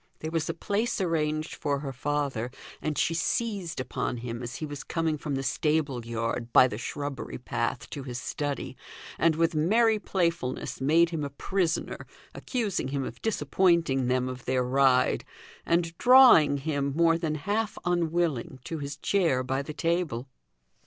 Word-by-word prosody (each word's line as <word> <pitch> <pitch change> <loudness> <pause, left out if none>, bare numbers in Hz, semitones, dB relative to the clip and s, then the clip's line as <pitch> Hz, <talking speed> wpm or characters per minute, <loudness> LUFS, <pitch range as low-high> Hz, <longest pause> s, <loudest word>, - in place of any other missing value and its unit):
There 155 - -5
was 165 -2 -1
a - - -2
place 210 +8 -1
arranged 155 -3 -1
for 145 -1 -1
her 135 -2 -5
father, 135 -3 -2 0.3
and 155 -2 -2
she 165 - +2
seized 195 - -1
upon 130 -1 -3
him 120 0 -5
as 120 0 -6
he 155 - -4
was 145 -1 -7
coming 165 -2 -1
from 150 -1 -4
the 135 - -2
stable 145 -2 0
yard, 115 +1 -3
by 130 - +7
the 110 -3 -6
shrubbery 145 +2 -5
path, 120 -1 -3
to 145 - -5
his 125 -2 -5
study, 145 +2 -4 0.4
and 165 -1 +3
with 165 +1 +2
merry 215 +8 +3
playfulness 170 -12 -2
made 165 +5 +4
him 160 -3 -2
a 140 - -3
prisoner, 170 +4 -2 0.3
accusing 220 - -2
him 135 0 -2
of - - -7
disappointing 170 - +2
them 125 0 +1
of 130 -1 -7
their 130 0 +1
ride, 130 0 +3 0.4
and 170 0 +1
drawing 245 - +7
him 140 -1 -1
more 165 0 +4
than 160 -3 -1
half 205 +8 -2
unwilling, 170 -7 0
to 165 +3 -5
his 145 0 -5
chair 160 -7 +1
by 135 +1 -1
the 140 - -6
table. 165 -7 -1
150 Hz, 165 wpm, -28 LUFS, 130-170 Hz, 0.4 s, by